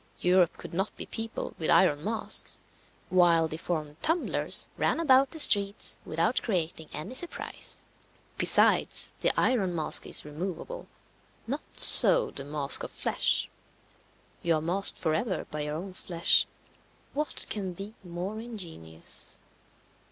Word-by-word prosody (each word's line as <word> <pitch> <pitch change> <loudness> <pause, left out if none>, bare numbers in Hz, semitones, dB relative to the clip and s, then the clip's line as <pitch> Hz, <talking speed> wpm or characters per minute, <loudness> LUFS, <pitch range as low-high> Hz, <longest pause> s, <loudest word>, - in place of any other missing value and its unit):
Europe 180 -1 +2
could - - -11
not 195 +5 -3
be - - -5
peopled 225 0 -6
with 160 - -3
iron 165 -4 +3
masks, 220 +3 0 0.5
while 170 -3 +3
deformed 155 -1 -5
tumblers 325 +2 0
ran - - 0
about 270 -4 +4
the 325 - -8
streets 200 -7 +3
without 165 +10 -1
creating 170 -6 -3
any 155 +11 -7
surprise. 345 +6 -4 0.6
Besides, - - +3
the - - +2
iron 195 -9 0
mask 155 -2 +1
is - - +1
removable; 185 - -7 0.6
not 280 +6 -7
so - - +8
the 135 - -6
mask 145 -1 0
of - - -6
flesh. - - -2 0.9
You 170 -1 +1
are - - -1
masked 180 +5 +3
for 160 -2 -2
ever 185 +2 -2
by 150 - -5
your 150 0 -4
own 185 +4 -7
flesh 170 -2 +1 0.7
what 300 +1 0
can 195 -4 -4
be 195 +4 -9
more 180 +4 -6
ingenious? 165 - -8
180 Hz, 135 wpm, -27 LUFS, 160-220 Hz, 0.9 s, so